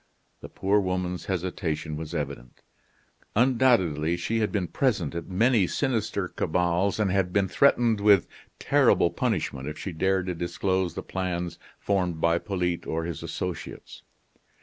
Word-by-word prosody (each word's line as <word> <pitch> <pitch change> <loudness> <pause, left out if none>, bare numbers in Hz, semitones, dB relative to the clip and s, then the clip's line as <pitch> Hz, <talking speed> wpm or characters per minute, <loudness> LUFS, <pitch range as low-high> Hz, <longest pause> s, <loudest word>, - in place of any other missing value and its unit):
The - - -10
poor 100 +2 +1
woman's 90 -2 -2
hesitation 85 -4 -3
was 80 +2 -6
evident; 70 -5 -6 0.7
undoubtedly 105 - +3
she 115 +6 -1
had 110 - 0
been 95 -4 -1
present 95 - 0
at 85 -1 -5
many 105 +1 +3
sinister 110 -7 -1
cabals, 90 +5 0
and 100 -3 +2
had 95 -1 +1
been 100 0 +2
threatened 120 -2 +3
with 100 -3 +5 0.3
terrible - - +3
punishment 65 +1 -2
if 75 - -5
she 95 - -5
dared 95 +2 0
to 90 - -2
disclose 90 +1 -1
the - - -5
plans 90 -2 -3 0.2
formed 90 -5 -1
by 85 +1 +2
Polyte 90 -3 -2
or 80 +1 -2
his 85 -2 -5
associates. - - -6
90 Hz, 145 wpm, -26 LUFS, 85-100 Hz, 0.7 s, with